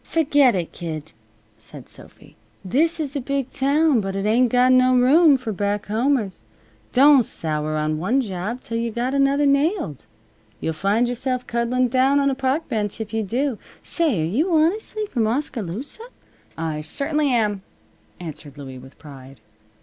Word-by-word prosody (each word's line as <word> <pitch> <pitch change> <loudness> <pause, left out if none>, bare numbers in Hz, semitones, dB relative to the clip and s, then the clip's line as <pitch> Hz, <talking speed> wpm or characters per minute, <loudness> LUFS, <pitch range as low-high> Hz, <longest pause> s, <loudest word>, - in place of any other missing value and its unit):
"Ferget 285 -7 +3
it, 175 -3 -3
kid," 160 -2 -7 0.5
said - - -12
Sophy. - - -15 0.3
"This 320 - +1
is 295 -2 -3
a 280 - -1
big 275 0 -2
town, 280 -1 +2
but 195 -1 -4
it 195 +1 -2
ain't 235 +4 +3
got 250 +1 +4
no 255 0 +4
room 285 +4 +5
for 250 -3 -5
back 205 +1 -2
homers. 225 -1 -1 0.5
Don't 275 +1 +6
sour 155 -5 -3
on 155 0 -1
one 215 +11 +1
job 210 +1 -4
till 230 - -4
you've 230 -1 -3
got 245 +3 -1
another 280 +1 +2
nailed. 280 - 0 0.5
You'll 160 - -2
find 200 +9 +1
yourself 250 +1 -3
cuddling 240 +2 0
down 265 +3 +3
on 275 0 +2
a - - 0
park 270 +4 -1
bench 215 -4 -3
if 220 -1 -6
you 225 - 0
do. 245 +4 -2 0.2
Say, 305 - 0
are - - 0
you 280 - 0
honestly 390 +7 +1
from 235 - -1
Oskaloosa?" 245 - -4 0.5
"I 160 -2 -3
certainly 295 - -1
am," 210 -5 +1 0.6
answered 155 -4 -8
Louie, 135 -2 -9
with 130 +2 -15
pride. 135 -3 -13
245 Hz, 165 wpm, -22 LUFS, 195-280 Hz, 0.6 s, Don't